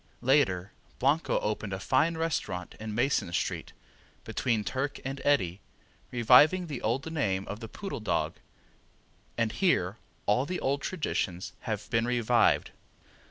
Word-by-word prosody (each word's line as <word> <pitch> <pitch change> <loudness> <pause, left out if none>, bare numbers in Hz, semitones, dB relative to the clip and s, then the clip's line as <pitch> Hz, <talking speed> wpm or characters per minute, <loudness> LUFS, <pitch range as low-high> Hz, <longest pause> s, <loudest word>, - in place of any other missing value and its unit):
Later 105 -9 +3 0.3
Blanco 145 +5 +2
opened 105 -1 -2
a 95 - -3
fine 155 +10 +2
restaurant 150 - -2
in 110 -1 -5
Mason 120 -7 +1
street, - - -2 0.5
between 115 -4 0
Turk 135 +6 -2
and 135 0 -4
Eddy, 95 -11 +2 0.5
reviving 130 +9 +6
the 145 -7 -5
old 130 +8 -1
name 100 -11 0
of 105 - -5
the 115 - -7
Poodle 195 - -5
Dog, 110 - 0 1.0
and 115 -2 +1
here 110 - +1 0.3
all 125 +7 +2
the 180 - -2
old 140 +1 0
traditions 95 - -2
have 110 -2 -4
been 115 -1 +2
revived. 120 -1 +3
120 Hz, 135 wpm, -29 LUFS, 105-145 Hz, 1.0 s, reviving